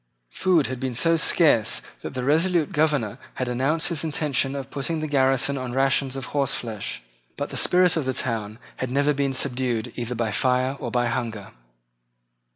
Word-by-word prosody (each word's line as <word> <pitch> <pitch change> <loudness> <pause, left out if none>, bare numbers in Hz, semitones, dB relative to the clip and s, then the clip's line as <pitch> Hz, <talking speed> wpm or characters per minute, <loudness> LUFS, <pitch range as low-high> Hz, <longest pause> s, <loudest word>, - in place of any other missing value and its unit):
Food 175 - +2
had 130 -1 -4
been 130 -2 -3
so 165 +6 +3
scarce 145 -9 +3 0.2
that - - -7
the 125 - -2
resolute 160 +3 +2
governor 145 -7 0 0.2
had 130 - -2
announced 135 +8 0
his 165 -3 -3
intention 150 -3 0
of 135 -1 -6
putting 155 +4 -2
the 155 - -3
garrison 135 -1 +2
on 125 -1 -5
rations 135 0 +1
of 135 -2 -4
horse 140 -3 +1
flesh. 110 - -5 0.3
But - - -3
the - - -7
spirit 180 -1 +4
of 160 -4 -1
the 130 - 0
town 110 -4 -2 0.2
had 130 - -3
never 140 +3 +2
been 140 -1 -1
subdued 125 -4 -1
either 120 0 -4
by 115 -2 -1
fire 130 +2 +1
or - - -4
by 120 0 +1
hunger. 115 -4 -3
135 Hz, 180 wpm, -24 LUFS, 125-150 Hz, 0.3 s, spirit